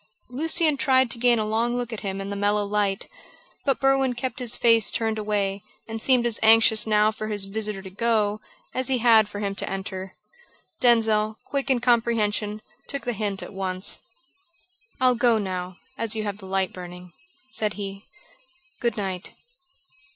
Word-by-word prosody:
Lucian 315 Hz, +2 st, +1 dB
tried 260 Hz, -2 st, +3 dB
to 235 Hz, -, 0 dB
gain 240 Hz, 0 st, +4 dB
a 215 Hz, -, 0 dB
long 230 Hz, +3 st, 0 dB
look 245 Hz, -1 st, -3 dB
at 220 Hz, -, -4 dB
him 195 Hz, -2 st, -4 dB
in 195 Hz, +1 st, -5 dB
the -, -, -3 dB
mellow 205 Hz, +1 st, +1 dB
light, 200 Hz, -1 st, -1 dB, 0.6 s
but 275 Hz, -3 st, +1 dB
Berwin 270 Hz, -1 st, +2 dB
kept 255 Hz, +2 st, -4 dB
his 245 Hz, -2 st, +1 dB
face 230 Hz, -3 st, +4 dB
turned 220 Hz, -1 st, -1 dB
away, 200 Hz, -2 st, -1 dB, 0.3 s
and 225 Hz, 0 st, -5 dB
seemed 250 Hz, -1 st, +3 dB
as 235 Hz, -2 st, 0 dB
anxious 220 Hz, 0 st, +5 dB
now 215 Hz, 0 st, +4 dB
for 215 Hz, 0 st, -6 dB
his 205 Hz, -2 st, -1 dB
visitor 210 Hz, -1 st, -3 dB
to 190 Hz, -, -8 dB
go 215 Hz, 0 st, 0 dB, 0.3 s
as 255 Hz, 0 st, -1 dB
he 265 Hz, -1 st, +2 dB
had 225 Hz, -2 st, +5 dB
been -, -, -13 dB
for 205 Hz, 0 st, -6 dB
him 200 Hz, -1 st, -1 dB
to -, -, -3 dB
enter. 190 Hz, -1 st, -5 dB, 0.6 s
Denzil, 220 Hz, -3 st, +3 dB
quick 275 Hz, -1 st, -3 dB
in 255 Hz, -3 st, +2 dB
comprehension, 220 Hz, -3 st, +1 dB, 0.2 s
took 280 Hz, -, -5 dB
the 245 Hz, -, -2 dB
hint 205 Hz, -2 st, -3 dB
at -, -, -9 dB
once. 190 Hz, -1 st, -3 dB, 1.0 s
"I'll 255 Hz, -1 st, +4 dB
go 240 Hz, -1 st, +3 dB
now, 185 Hz, -3 st, -4 dB, 0.2 s
as 230 Hz, -1 st, -1 dB
you 215 Hz, -, -2 dB
have 205 Hz, -1 st, -4 dB
the 190 Hz, -, -10 dB
light 190 Hz, 0 st, -1 dB
burning," 180 Hz, 0 st, -10 dB, 0.4 s
said 210 Hz, -1 st, -1 dB
he. 195 Hz, -1 st, -7 dB, 0.7 s
"Good 235 Hz, -1 st, -1 dB
night." 190 Hz, -3 st, -4 dB
215 Hz, 180 wpm, -24 LUFS, 200-240 Hz, 1.0 s, anxious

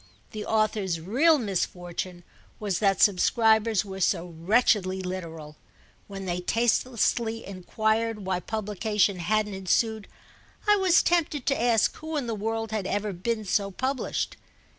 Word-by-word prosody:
The 215 Hz, -1 st, -6 dB
author's 215 Hz, -5 st, 0 dB
real 270 Hz, -, +3 dB
misfortune 180 Hz, -4 st, -3 dB, 0.4 s
was 200 Hz, -4 st, -1 dB
that 195 Hz, -3 st, +2 dB
subscribers 220 Hz, +2 st, +3 dB
were 190 Hz, -1 st, -7 dB
so 175 Hz, -2 st, 0 dB
wretchedly 190 Hz, +1 st, +2 dB
literal. 165 Hz, -5 st, -6 dB, 0.5 s
When 195 Hz, -1 st, -7 dB
they 175 Hz, -1 st, -2 dB
tastelessly 230 Hz, +1 st, 0 dB
enquired 215 Hz, +3 st, -1 dB
why 185 Hz, -1 st, 0 dB
publication 210 Hz, 0 st, -1 dB
hadn't 210 Hz, +4 st, 0 dB
ensued 205 Hz, +3 st, 0 dB, 0.6 s
I 420 Hz, -, +6 dB
was 375 Hz, -3 st, +4 dB
tempted 310 Hz, -6 st, +1 dB
to 275 Hz, -, +1 dB
ask 235 Hz, -3 st, +3 dB
who 315 Hz, 0 st, -4 dB
in 280 Hz, -, -2 dB
the 230 Hz, -, -2 dB
world 225 Hz, +1 st, -3 dB
had 215 Hz, -3 st, -2 dB
ever 205 Hz, 0 st, -2 dB
been 215 Hz, +4 st, -2 dB
so 200 Hz, +1 st, 0 dB
published. 260 Hz, +7 st, -2 dB
210 Hz, 135 wpm, -26 LUFS, 185-225 Hz, 0.6 s, I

